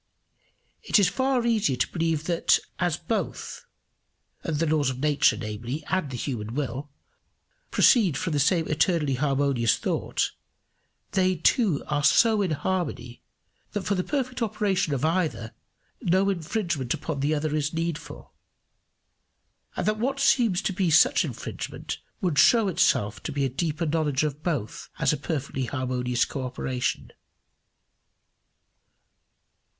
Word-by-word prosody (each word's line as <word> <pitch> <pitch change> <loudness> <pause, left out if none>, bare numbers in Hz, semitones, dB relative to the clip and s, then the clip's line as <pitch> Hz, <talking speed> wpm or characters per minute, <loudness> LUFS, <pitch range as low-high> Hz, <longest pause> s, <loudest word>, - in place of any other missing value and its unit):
It - - +2
is 195 -3 +4
far 260 0 0
easier 215 - +2
to 125 - 0
believe 165 -3 0
that 170 0 +3 0.2
as - - +1
both - - -4 0.8
the 160 0 -1
laws 150 -3 +2
of 130 - -4
nature, 150 0 +3
namely, 120 +6 -5
and 185 -6 0
the 125 - -5
human 115 -3 -4
will 140 0 -3 0.8
proceed 195 - +4
from 165 +3 -2
the 145 - +1
same 160 +3 +2
eternally 155 -2 +1
harmonious 135 -3 +1
thought, - - -1 0.8
they 185 -1 +2
too 175 - +2
are 145 -1 -1
so 220 +7 +5
in 190 - 0
harmony, 155 -5 -3 0.5
that 205 - -2
for 190 +3 0
the 185 -2 0
perfect 255 -1 -2
operation 195 -6 0
of 135 +3 -1
either 160 -9 -1 0.5
no 190 +3 +2
infringement 170 - -2
upon 155 -4 -4
the 145 +3 +1
other 150 0 -1
is 150 0 0
needful; 165 -1 -5 1.4
and - - -2
that 215 +1 0
what 270 +4 -1
seems 230 -8 +3
to 195 - -1
be 185 -1 +1
such 160 - +5
infringement - - -6 0.2
would 175 -7 +1
show 230 -4 +5
itself 105 - +1
to - - -5
a 135 -1 +1
deeper 155 +5 -2
knowledge 150 -3 0
of 150 -1 -3
both 145 - -3
as - - +2
a - - +1
perfectly 140 -3 -3
harmonious 125 -1 -1
co 135 - -5
operation. 125 0 -3
155 Hz, 135 wpm, -26 LUFS, 135-185 Hz, 1.4 s, so